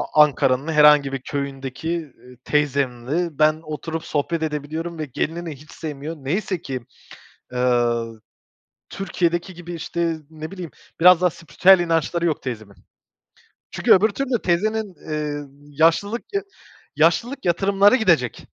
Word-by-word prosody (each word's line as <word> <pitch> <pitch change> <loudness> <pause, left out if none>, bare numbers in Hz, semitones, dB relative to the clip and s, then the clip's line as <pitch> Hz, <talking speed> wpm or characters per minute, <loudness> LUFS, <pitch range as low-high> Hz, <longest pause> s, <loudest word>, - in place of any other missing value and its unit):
Ankara'nın 145 -1 +3
herhangi 150 -2 +5
bir 135 - -3
köyündeki, 140 +2 -5
eee, 145 -7 -6
teyzemle 140 +2 -1
ben 155 +1 +3
oturup 160 +1 -5
sohbet 160 +2 -1
edebiliyorum 160 +2 -4
ve 155 - -2
gelinini 160 +4 -4
hiç 150 +3 -16
sevmiyor. 155 0 -6
Neyse 170 +5 -2
ki, 130 -2 -5 0.7
eee, 125 -1 +2 1.0
Türkiye'deki 175 -1 -2
gibi, 175 0 -9
işte, 165 0 -2
ne 155 +2 -8
bileyim, 180 -4 -7 0.3
biraz 180 +1 +7
daha 180 - +4
spiritüel 175 +4 +4
inançları 170 0 0
yok 155 -3 0
teyzemin. 110 -6 -6 1.0
Çünkü - - +4
öbür 205 +4 +5
türlü 250 +1 -2
teyzenin, 205 +2 0 0.2
eee, 150 -1 -3 0.4
yaşlılık 200 +8 +3
y 400 - +1 0.5
yaşlılık 260 -1 +1
yatırımları 195 +5 +4
gidecek. 165 - +1
160 Hz, 125 wpm, -22 LUFS, 145-175 Hz, 1.0 s, biraz